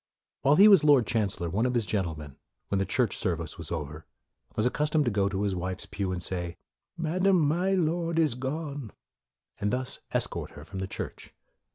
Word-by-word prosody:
While 140 Hz, +2 st, +5 dB
he 200 Hz, +6 st, +8 dB
was 195 Hz, -7 st, +7 dB
Lord 145 Hz, -5 st, +6 dB
Chancellor, 105 Hz, -6 st, -1 dB
one 105 Hz, +9 st, +1 dB
of 125 Hz, -, -1 dB
his 115 Hz, -3 st, +1 dB
gentlemen, 80 Hz, -9 st, -3 dB, 0.3 s
when 100 Hz, -, +1 dB
the 95 Hz, -, 0 dB
church 120 Hz, -6 st, +1 dB
service 85 Hz, -3 st, -3 dB
was 80 Hz, -3 st, -7 dB
over, 80 Hz, -1 st, -5 dB, 0.5 s
was 110 Hz, -, +1 dB
accustomed 150 Hz, +3 st, +1 dB
to 120 Hz, -, +1 dB
go 100 Hz, -1 st, +1 dB
to 100 Hz, 0 st, -2 dB
his 100 Hz, -2 st, 0 dB
wife's 90 Hz, +1 st, -4 dB
pew, 95 Hz, -2 st, -3 dB
and 90 Hz, -, -2 dB
say, 90 Hz, -1 st, -2 dB, 0.2 s
" -, -, -52 dB
Madam, 180 Hz, +3 st, +2 dB
my 180 Hz, +6 st, +1 dB
Lord 170 Hz, -1 st, 0 dB
is 155 Hz, -5 st, +3 dB
gone," 140 Hz, -1 st, -4 dB, 0.7 s
and 105 Hz, -, 0 dB
thus 125 Hz, +2 st, -1 dB
escort -, -, -1 dB
her 75 Hz, -, -11 dB
from 90 Hz, +4 st, -7 dB
the 95 Hz, -, -3 dB
church. -, -, -7 dB
110 Hz, 195 wpm, -28 LUFS, 95-150 Hz, 0.7 s, he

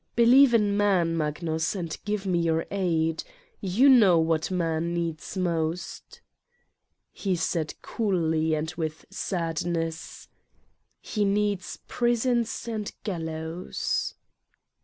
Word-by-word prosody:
Believe 240 Hz, +2 st, +6 dB
in 205 Hz, -3 st, +3 dB
Man, 190 Hz, -5 st, +2 dB
Magnus, 160 Hz, +2 st, -1 dB
and 170 Hz, -4 st, -3 dB
give 205 Hz, -1 st, -2 dB
me 180 Hz, -3 st, +1 dB
your 165 Hz, -1 st, +1 dB
aid. 165 Hz, -5 st, 0 dB, 0.4 s
You 205 Hz, +7 st, +3 dB
know 210 Hz, -11 st, +7 dB
X.what 160 Hz, -1 st, +1 dB
Man 165 Hz, 0 st, -1 dB
needs 170 Hz, +1 st, -3 dB
most." 170 Hz, -1 st, -3 dB, 0.9 s
He 190 Hz, -3 st, -1 dB
said 165 Hz, -2 st, -1 dB
coldly 160 Hz, -7 st, 0 dB
and 160 Hz, +2 st, -3 dB
with 160 Hz, -2 st, -4 dB
sadness: 165 Hz, -3 st, -3 dB, 0.7 s
"He 210 Hz, -, -1 dB
needs 205 Hz, -1 st, 0 dB
prisons 240 Hz, -1 st, 0 dB
and 220 Hz, -2 st, -3 dB
gallows." 165 Hz, -2 st, -3 dB
175 Hz, 105 wpm, -26 LUFS, 160-205 Hz, 0.9 s, know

